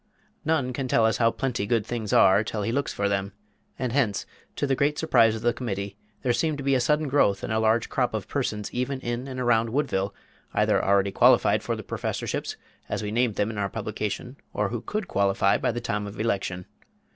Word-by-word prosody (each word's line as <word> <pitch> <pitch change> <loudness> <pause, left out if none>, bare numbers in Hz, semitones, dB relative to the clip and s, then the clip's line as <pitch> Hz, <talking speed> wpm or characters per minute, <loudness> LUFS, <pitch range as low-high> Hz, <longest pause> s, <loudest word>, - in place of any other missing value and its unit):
None 140 -5 0
can 130 +1 -3
tell 115 -2 +3
us 110 - +2
how 115 -1 +4
plenty 120 -4 -2
good 115 -2 +1
things 115 -3 -4
are 95 +3 +6
till 105 0 -3
he 115 - -1
looks 140 +3 -1
for 100 - -1
them; 100 0 -1 0.4
and 125 -2 -2
hence, 110 -9 +1 0.3
to - - 0
the 135 - +1
great 145 +3 +1
surprise 115 -8 +4
of 110 - -7
the 120 0 +3
Committee, 100 -5 -4 0.3
there 125 - +2
seemed 155 +3 0
to 140 - -5
be 135 0 +2
a 130 - +3
sudden 150 +5 +1
growth 115 -8 +2
and 110 - -2
a 110 - +2
large 110 +1 +2
crop 125 -3 0
of 105 - -4
persons 105 -7 -2
even 130 +2 -2
in 120 +2 -3
and 130 -1 -5
around 115 -2 +2
Woodville, 110 -7 0 0.4
either - - +3
already 100 0 +3
qualified - - +4
for - - -2
the - - -7
"Professorships," - - -3 0.3
as - - -2
we 105 - -3
named 120 -1 +1
them 105 +2 0
in 105 - -5
our 100 -1 0
publication, 110 +4 -4 0.2
or 105 -1 0
who 120 0 -3
could 210 - -3
"qualify" 100 0 +2
by - - +1
the 120 - -3
time 105 -3 -2
of 100 +1 -9
election. 95 -5 -1
115 Hz, 220 wpm, -26 LUFS, 100-130 Hz, 0.4 s, are